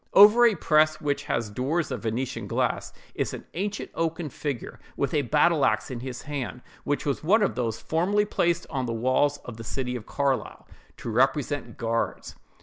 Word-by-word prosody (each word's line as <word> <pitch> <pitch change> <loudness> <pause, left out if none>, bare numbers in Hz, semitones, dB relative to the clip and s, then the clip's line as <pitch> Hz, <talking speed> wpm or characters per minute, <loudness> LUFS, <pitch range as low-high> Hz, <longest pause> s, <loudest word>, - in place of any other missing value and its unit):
Over 215 +4 +9
a 220 - +2
press, 155 -1 +3
which 145 -1 -1
has 120 -7 -1
doors 140 +8 -1
of - - -3
Venetian 120 +3 -3
glass, - - -1 0.2
is - - -2
an - - -10
ancient 200 +3 -3
oaken 165 -1 -2
figure, 140 -2 -5 0.2
with 140 -2 -1
a 150 - +3
battle 150 +3 +3
axe 110 -1 +1
in 125 - -4
his 125 0 -6
hand, 135 -4 -5 0.2
which 145 - -1
was 140 0 -1
one 210 +7 +4
of - - +1
those 115 -3 -2
formerly 195 +6 +1
placed 170 -4 0
on 130 -4 -1
the 115 - -2
walls 130 +5 +2
of 120 -3 -8
the 115 - -7
city 125 +2 -3
of 115 -3 -7
Carlisle, 135 -6 -1 0.3
to - - -6
represent 135 +4 +1
guards. 115 -1 -2
140 Hz, 185 wpm, -26 LUFS, 125-160 Hz, 0.3 s, Over